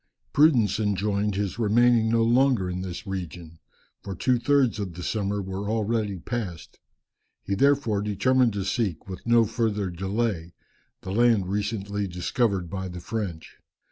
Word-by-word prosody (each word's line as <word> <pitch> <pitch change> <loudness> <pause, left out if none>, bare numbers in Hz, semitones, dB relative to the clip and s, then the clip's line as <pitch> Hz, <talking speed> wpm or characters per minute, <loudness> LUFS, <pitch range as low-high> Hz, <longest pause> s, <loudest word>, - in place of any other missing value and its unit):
Prudence 120 - +4
enjoined 105 0 0
his 100 +2 -2
remaining 115 +1 +4
no 115 0 +3
longer 120 -3 +3
in 90 0 -3
this 95 +4 -6
region, 85 -4 -6 0.4
for 100 -1 -6
two 125 +6 +1
thirds 135 -4 +2
of 95 -5 -4
the 90 - -7
summer 100 -1 -1
were 95 +2 -4
already 110 -2 -1
passed. 95 -3 -6 0.6
He 100 - -2
therefore 135 -3 +2
determined 120 +4 +2
to 100 -2 -3
seek, 100 -5 -2
with 95 +4 -8
no 115 -1 +5
further 105 -4 -1
delay, 95 -1 -2 0.5
the 95 - -6
land 110 -4 +3
recently 100 -1 -2
discovered 90 +2 -1
by 95 +2 -4
the 90 -1 -7
French. 90 -4 -5
105 Hz, 145 wpm, -26 LUFS, 95-115 Hz, 0.6 s, no